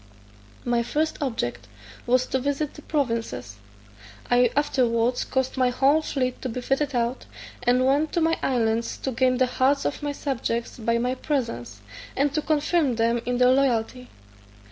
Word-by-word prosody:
My 240 -1 +2
first 305 +7 -1
object 120 - -3 0.4
was 255 +1 +3
to 265 - -1
visit 285 +2 -2
the 300 - -12
provinces: 230 - -2 0.7
I 245 0 +5
afterwards 245 -4 +1
caused 260 0 -2
my 255 -1 +3
whole 275 +5 +3
fleet 255 -4 -2
to 260 - -3
be 245 - -4
fitted 270 +2 -1
out, 240 +1 -1 0.3
and 250 +1 +3
went 285 +4 +2
to - - +1
my 325 +1 +3
islands 230 -3 0
to 265 - -3
gain 255 +1 +2
the 255 - +4
hearts 265 +3 +1
of 285 - -2
my 290 0 -2
subjects 240 -5 -3
by 230 +1 +1
my 250 +2 0
presence, 175 - -3 0.4
and 280 +1 +2
to 305 - 0
confirm 300 -3 +1
them 230 +1 +1
in 245 0 0
their 250 0 +5
loyalty. 250 -2 0
255 Hz, 165 wpm, -25 LUFS, 235-280 Hz, 0.7 s, I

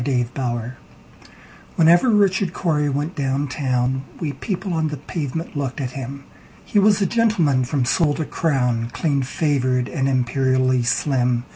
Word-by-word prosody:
Richard 125 -2 -1
Corey 120 -3 -3 1.0
WHENEVER 170 +8 +5
Richard 195 -4 +2
Cory 150 -4 0
went 145 +5 -2
down 140 +1 -1
town, 130 -1 -1 0.2
We 150 -4 -3
people 190 - -4
on 160 -1 0
the 150 -1 -4
pavement 155 +2 -5
looked 140 -1 -3
at 130 -3 -3
him:He 140 - -5
was 205 0 +4
a - - +2
gentleman 180 - +2
from 135 -1 0
sole 150 +2 +2
to 160 - -3
crown, 125 -9 0
Clean 145 -4 0
favored, 130 -2 0
and 135 -3 -1
imperially 130 0 +1
slim. 125 -1 +1
140 Hz, 145 wpm, -21 LUFS, 130-160 Hz, 1.0 s, WHENEVER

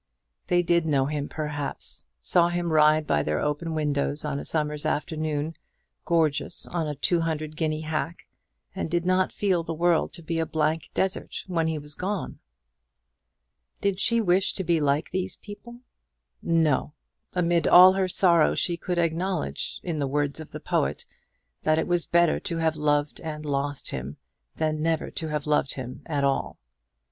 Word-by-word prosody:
They 175 0 +3
did 170 -1 +2
know 140 -3 +2
him, 145 0 -3
perhaps, 150 - 0
saw 170 - +3
him 175 -1 -1
ride 155 0 +5
by 75 - +2
their 75 +1 -1
open 150 +2 -2
windows, 145 -1 0
on 145 -1 -2
a - - -7
summer's 150 -2 -1
afternoon, 155 0 -2 0.5
gorgeous 160 -4 +1
on 165 -3 -2
a 150 - -3
two 170 +5 +1
hundred 155 -1 -3
guinea 155 -1 -1
hack, 160 +2 -3 0.5
and 190 - -3
did 175 +1 0
not 185 0 +2
feel 190 -4 +1
the 165 0 -5
world 170 0 +2
to 170 - -8
be 165 +1 -2
a 160 - +1
blank 155 +1 -1
desert 190 0 -1
when 165 -3 0
he 160 -1 -1
was 150 0 -6
gone. 190 +4 -4 1.4
Did 200 -1 0
she 235 +3 +3
wish 190 -2 +2
to 190 - -3
be 170 -2 +2
like 145 +1 +1
these 185 0 -2
people? 235 +4 -11 0.6
No! 160 -3 +1 0.4
Amid 170 -2 +2
all 185 +1 +9
her 190 -1 +1
sorrow 170 -3 +3
she 170 -1 +1
could 180 +1 -3
acknowledge, 170 +1 -1
in 165 -4 -3
the 140 - 0
words 145 +2 -1
of 155 - -8
the - - -7
poet, 70 +2 -1 0.6
that 155 0 +2
it 160 - +1
was 175 -1 0
better 170 -1 +3
to 170 -5 -3
have 160 -1 +1
loved 145 -1 0
and 155 -1 -6
lost 145 0 -2
him, 65 +2 -5 0.4
than 155 -1 -1
never 165 0 0
to 160 - -4
have 150 -2 -3
loved 150 -3 +1
him 130 -1 -7
at 145 -3 -1
all. 135 -1 0
160 Hz, 175 wpm, -26 LUFS, 150-175 Hz, 1.4 s, all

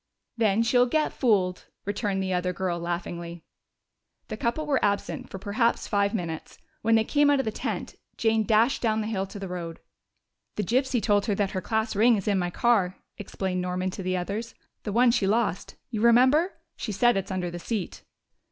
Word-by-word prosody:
"Then 225 -1 +2
she'll 245 +2 +4
get 305 +4 0
fooled," 190 -7 +1 0.2
returned 200 -1 -1
the 190 0 -1
other 180 0 0
girl 175 -1 -2
laughingly. 170 0 -5 0.9
The - - -3
couple 235 +8 -1
were 285 -3 +1
absent 200 -1 -1
for - - -6
perhaps 215 +4 0
five 200 0 +1
minutes. 165 -5 -5 0.2
When 225 +1 +3
they 225 - +4
came 290 +5 +3
out 285 - +4
of 270 - 0
the 220 - -1
tent - - -4 0.2
Jane 225 -1 +2
dashed 225 +4 +3
down 220 -2 +1
the - - -3
hill 195 -3 -2
to 205 - -9
the 195 -1 -5
road. 170 -2 -6 0.8
"The 210 - -1
gypsy 250 +3 +1
told 205 -1 +2
her 205 - +1
that 195 -1 0
her 185 - -3
class 220 +3 -1
ring 230 +3 +5
is 200 -1 -4
in 200 -2 +2
my 175 -1 -1
car," 190 -2 +2 0.2
explained 190 -2 -3
Norman 180 +1 -2
to 190 - -6
the 185 0 -1
others. 205 +6 -4 0.3
"The 210 - -4
one 240 +3 +5
she 225 -5 +1
lost, 210 -3 0 0.2
you 215 -3 -2
remember? 260 - +5 0.2
She 220 - -4
said 240 +4 +3
it's 195 -1 -2
under 180 -2 -2
the 175 - -6
seat." 205 0 -4
205 Hz, 200 wpm, -26 LUFS, 185-230 Hz, 0.9 s, ring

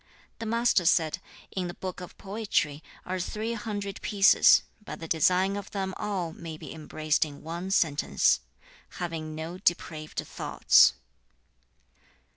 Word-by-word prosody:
The 225 - -4
Master 230 -4 +2
said, 160 -2 +2 0.3
'In 185 -2 -2
the 175 - -7
Book 185 -1 -6
of 180 - -10
Poetry 195 -8 -1 0.2
are 185 0 -3
three 215 +5 -3
hundred 205 -3 -5
pieces, 200 -1 +6 0.2
but - - -8
the 165 - -7
design 180 +5 +2
of 205 0 -6
them 190 -2 -3
all 190 -6 -3
may 160 -2 -8
be - - -9
embraced 155 -1 0
in 145 -2 -8
one 170 +3 -5
sentence 155 - +2 0.6
"Having 160 -3 -4
no 165 +3 -6
depraved 160 -4 -1
thoughts."' - - +4
180 Hz, 135 wpm, -28 LUFS, 160-200 Hz, 0.6 s, pieces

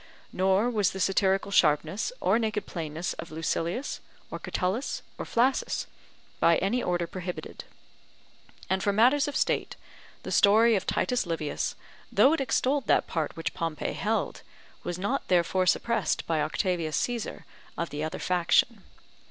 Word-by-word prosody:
Nor 190 +4 +2
was 210 -5 +2
the 190 - -6
satirical 195 +1 +1
sharpness 160 - +2
or 230 - +2
naked 215 -3 -1
plainness 160 0 -4
of 170 - -6
Lucilius, 165 - -2 0.3
or - - -5
Catullus, 190 +9 -2 0.2
or - - -3
Flaccus, 255 +3 +1 0.5
by 170 -1 +5
any 220 +6 0
order 175 -3 0
prohibited. 180 +1 -7 1.0
And 190 0 0
for 200 - +2
matters 255 +8 +4
of 290 - -4
state, - - 0 0.5
the - - -6
story 220 +3 +5
of 190 - -2
Titus 250 -7 0
Livius, 165 -3 -2 0.4
though 275 - +5
it 325 - 0
extolled 270 -1 +1
that - - +3
part 160 -4 -3
which 165 - -3
Pompey 165 -2 -3
held, - - -1 0.4
was 175 0 -3
not 205 +9 -2
therefore 180 +1 +2
suppressed 220 -2 +1
by 160 -2 0
Octavius 170 -4 -1
Caesar 240 -3 -3 0.3
of 170 - -3
the 150 +1 -3
other 160 +4 -3
faction. 185 +4 +2
190 Hz, 145 wpm, -28 LUFS, 170-230 Hz, 1.0 s, by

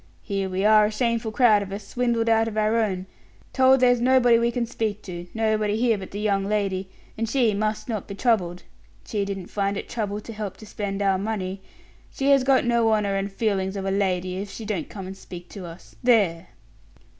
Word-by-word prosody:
Here 195 -3 -2
we 190 +2 -1
are 215 0 +6
a - - -4
shameful 230 -1 -1
crowd 220 -3 +4
of 195 -1 -6
us, 200 0 -6
swindled 235 -2 0
out 225 0 +3
of 215 -1 -5
our 215 +1 +2
own, 190 -5 0 0.5
told 260 0 +5
there's 245 -1 +4
nobody 245 -2 +5
we 235 0 +2
can 240 0 -1
speak 220 -3 -3
to; 175 -1 -7
nobody 215 -1 +1
here 235 -1 +3
but 195 -2 -7
the 205 - -6
young 200 -2 +1
lady, 195 -2 -1 0.3
and 225 -1 -1
she 240 -4 +2
must 215 +1 -2
not 220 -5 -3
be 200 - -6
troubled. 185 -7 0 0.4
She 205 -2 -2
didn't 195 -2 -6
find 200 -1 -1
it - - -5
trouble 210 -3 -3
to 225 +2 -9
help 210 -3 -5
to 215 - -12
spend 205 -1 -3
our 195 -1 +2
money. 195 -2 -3 0.5
She 275 +1 0
has 275 -2 +5
got 265 -1 +3
no 235 -1 +3
honor 210 -2 +1
and 195 +1 -2
feelings 195 -2 -1
of 195 -1 -4
a 195 - 0
lady, 185 -2 0
if 200 +1 -5
she 220 - -8
don't 200 -7 -3
come 195 -3 -7
and 190 +1 -7
speak 175 -2 -11
to 190 -4 -8
us. 170 +2 -13
There." 195 -8 +3
210 Hz, 215 wpm, -24 LUFS, 195-230 Hz, 0.5 s, are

